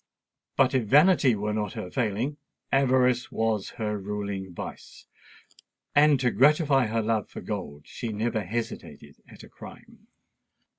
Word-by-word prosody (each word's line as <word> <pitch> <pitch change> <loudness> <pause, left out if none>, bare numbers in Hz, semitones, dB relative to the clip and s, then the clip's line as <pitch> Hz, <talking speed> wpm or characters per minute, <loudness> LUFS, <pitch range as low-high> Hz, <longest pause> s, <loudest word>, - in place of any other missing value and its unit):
But 135 -1 +4
if 130 -4 +1
vanity 145 - +5
were 105 +1 -2
not 105 -2 -2
her 90 - -6
failing, 125 +4 -1 0.3
avarice 125 -2 +2
was 110 -3 -1
her 105 -2 -2
ruling 100 -1 -5
vice; 85 - -9 0.9
and 145 -1 +5
to 125 -2 +1
gratify 140 - +3
her 115 +1 -1
love 110 -2 -1
for - - -8
gold 70 0 -6
she 115 - -6
never 110 +1 -1
hesitated 115 +5 -6
at - - -14
a - - -12
crime. - - -14
115 Hz, 140 wpm, -26 LUFS, 105-130 Hz, 0.9 s, vanity